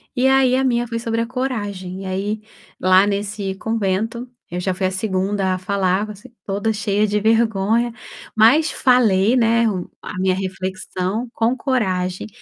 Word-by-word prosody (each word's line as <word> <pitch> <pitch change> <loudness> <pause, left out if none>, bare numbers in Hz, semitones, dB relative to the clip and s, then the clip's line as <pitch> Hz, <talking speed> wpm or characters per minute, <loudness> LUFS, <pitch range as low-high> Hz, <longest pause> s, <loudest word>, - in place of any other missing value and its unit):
E 250 +1 +3
aí 265 -1 +4
a 265 - +1
minha 240 -2 +1
foi 230 0 -3
sobre 230 0 -1
a 230 - -2
coragem 205 -8 -4
e - - -7
aí 200 +3 -2 0.4
lá 185 +1 +5
nesse 200 -1 -2
convento, 225 +3 -2 0.2
eu 175 - -3
já 185 +1 -1
fui 185 +1 0
a - - -2
2º 190 0 -1
a - - -1
falar, 190 +1 0
você 210 +4 -11
toda 205 +3 -1
cheia 210 -1 +1
de 210 0 0
vergonha, 225 +1 +2 0.4
mas 245 +9 +5
falei, 230 -4 +3
né, 230 -1 +3
o 185 -4 -4
a - - -7
minha 185 0 +2
reflexão 190 +3 -3
com 230 +1 +1
coragem. 185 -10 -1
210 Hz, 165 wpm, -20 LUFS, 190-230 Hz, 0.4 s, lá